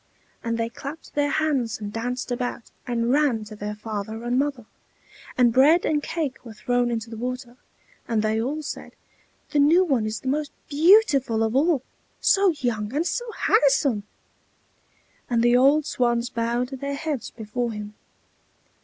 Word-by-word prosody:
And 230 0 -1
they 230 0 0
clapped 280 +6 -9
their 290 0 +1
hands 275 -8 0
and 205 -1 -6
danced 245 +3 -3
about, 245 -1 -4 0.2
and 235 -1 0
ran 275 -6 +2
to 215 0 -10
their 210 0 -5
father 220 +1 -5
and 245 +2 +1
mother; 275 -5 -2 0.7
and 240 -2 +4
bread 300 +8 +5
and 300 -1 +1
cake 295 -4 -3
were 230 -3 -10
thrown 245 +2 0
into 230 -1 -3
the 225 - -6
water; 250 +1 -5 0.5
and 225 -2 0
they 220 +1 +1
all 295 +6 -3
said, 285 - -7 0.6
"The 300 - +2
new 320 +6 +5
one 255 -9 +1
is 215 0 -4
the - - -7
most 290 +2 -1
beautiful 285 - +4
of 220 +2 -1
all! 290 -1 +3 0.4
so 395 -1 +4
young 240 -9 -2
and 315 +3 +1
so 480 +4 -2
handsome!" 275 - +2 1.3
and 235 -2 +2
the 240 0 +5
old 280 +4 +4
swans 240 -2 0
bowed 235 +1 -1
their 280 +1 -4
heads 290 -3 -3
before 235 +2 -4
him. 210 -1 -7
245 Hz, 160 wpm, -24 LUFS, 230-290 Hz, 1.3 s, bread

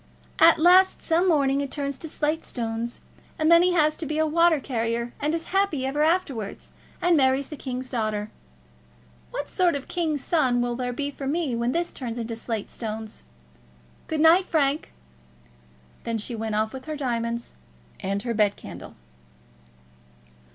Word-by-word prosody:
At 330 +1 +7
last 365 +3 +5
some 340 +3 +2
morning 280 -4 +3
it 280 - -3
turns 280 -1 -3
into 320 - -7
slate 305 +2 -1
stones, 230 0 -4 0.4
and 310 +1 +2
then 335 0 +8
he 360 0 +3
has 310 -3 +3
to 325 - -5
be 305 - -2
a 315 - +3
water 335 0 +4
carrier, 235 -2 -2
and 300 +3 0
is 330 - -3
happy 385 -9 +1
ever 280 +3 -1
afterwards, 300 - -1 0.3
and 350 -1 +4
marries 265 -1 +2
the 300 - -6
king's 255 -2 -5
daughter. 215 -3 -2 1.0
What - - -4
sort 355 -4 +2
of 280 - -3
a - - -20
king's 315 -6 -2
son 260 -8 +2
will 240 0 0
there 250 0 -2
be 285 +3 -3
for 275 -1 -6
me 295 -4 0
when 235 +1 0
this 340 +4 -1
turns 240 -3 -5
into 230 -1 -4
slate 225 -2 -4
stones? 220 -1 -6 0.9
Good 315 -1 -1
night, 340 +4 +6
Frank." 290 -2 +1 1.1
Then 230 -1 -2
she 220 +3 -3
went 220 -1 -3
off 220 +1 0
with 260 -1 -8
her 310 0 -4
diamonds 235 -3 -2 0.5
and 200 +1 -2
her 240 -1 -2
bed 210 -2 +2
candle. - - -10
275 Hz, 170 wpm, -25 LUFS, 235-320 Hz, 1.1 s, then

